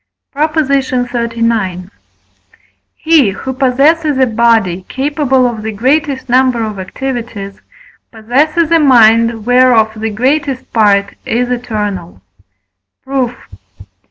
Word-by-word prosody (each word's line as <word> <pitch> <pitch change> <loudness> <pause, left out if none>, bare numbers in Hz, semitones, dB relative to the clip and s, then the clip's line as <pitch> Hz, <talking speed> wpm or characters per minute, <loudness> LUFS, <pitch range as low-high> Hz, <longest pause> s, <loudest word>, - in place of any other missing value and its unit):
PROP. 305 +2 -2
XXXIX. 235 - -1 1.0
He, 315 -8 +3
who 260 +7 -5
possesses 280 +4 +1
a 260 - +4
body 220 -6 +1
capable 270 -1 0
of 230 -3 -5
the 220 +1 -4
greatest 265 +5 -1
number 250 -1 +2
of 215 -3 -5
activities, 225 -1 -6 0.5
possesses 290 +9 0
a 330 - +4
mind 230 -5 +4
whereof 245 -3 +3
the 225 +1 -2
greatest 260 +4 -2
part 200 -3 +2
is 245 +1 -2
eternal. 210 - -4 0.8
Proof. 260 -2 -2
245 Hz, 100 wpm, -13 LUFS, 220-270 Hz, 1.0 s, a